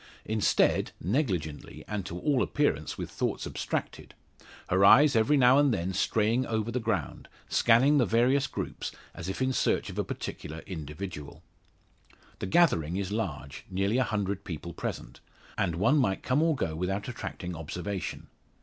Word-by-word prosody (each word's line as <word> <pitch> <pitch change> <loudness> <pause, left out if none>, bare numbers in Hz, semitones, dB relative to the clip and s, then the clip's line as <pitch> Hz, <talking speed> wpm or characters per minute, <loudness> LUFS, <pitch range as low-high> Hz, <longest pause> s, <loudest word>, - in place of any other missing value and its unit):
Instead, 110 -1 +2
negligently, 90 - -2
and 100 -3 -3
to 85 - -5
all 135 +6 +1
appearance, 145 - 0
with - - -4
thoughts - - -2
abstracted; - - -4 0.5
her 95 +2 +3
eyes 145 +7 +7
every 115 +7 +4
now 130 +1 +6
and 145 -2 +4
then 95 -3 -1
straying 110 +6 +1
over 110 0 -1
the 125 - -1
ground, 105 - -3 0.2
scanning 130 +6 +4
the 125 - +4
various 125 +6 +3
groups, - - -5 0.2
as 85 - -6
if 95 - -2
in 130 0 +1
search - - 0
of - - -6
a - - +2
particular 80 +2 -6
individual. 75 -2 -7 1.0
The - - -3
gathering 90 - +3
is 100 -1 -3
large 85 -10 -4
nearly 100 +6 +1
a - - +4
hundred 100 -4 -2
people 85 -2 -6
present - - -6 0.4
and 85 - 0
one 140 - +3
might 95 -8 0
come 130 +4 +2
or 165 -1 +3
go 80 - -2
without 95 +4 -2
attracting 90 -7 -6
observation. 90 +4 -5
100 Hz, 160 wpm, -29 LUFS, 90-125 Hz, 1.0 s, eyes